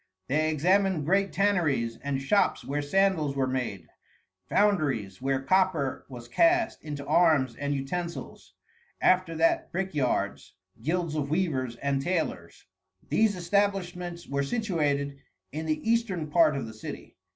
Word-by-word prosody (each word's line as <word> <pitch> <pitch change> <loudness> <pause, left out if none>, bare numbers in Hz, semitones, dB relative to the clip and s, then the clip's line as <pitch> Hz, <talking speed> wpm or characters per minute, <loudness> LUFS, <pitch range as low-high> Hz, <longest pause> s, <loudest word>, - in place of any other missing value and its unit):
They 155 +3 +1
examined 180 +1 +2
great 195 +4 +2
tanneries, 155 - +1
and 140 -1 -2
shops 200 +10 +1
where 145 +2 -2
sandals 160 -2 +1
were 135 -1 +1
made, 125 -9 -3 0.6
foundries 140 - +1
where 135 0 0
copper 175 -5 +1
was 120 -2 -9
cast 340 - +2
into 145 -2 -6
arms 155 -8 +3
and 145 0 -2
utensils. 170 +6 -5 0.4
After 185 -3 +3
that, 165 +1 +2
brickyards, 170 -8 -2 0.3
guilds 170 0 -1
of 145 -2 -2
weavers 145 -8 -1
and 140 +2 -1
tailors. 150 - -3 0.4
These 220 -2 +3
establishments 180 -2 -1
were 140 0 -1
situated 145 - -1 0.3
in 160 +2 -4
the 155 +7 -2
eastern 200 -10 0
part 155 -3 +4
of 135 - -3
the 110 - -9
city. 110 - -9
155 Hz, 130 wpm, -28 LUFS, 140-185 Hz, 0.6 s, part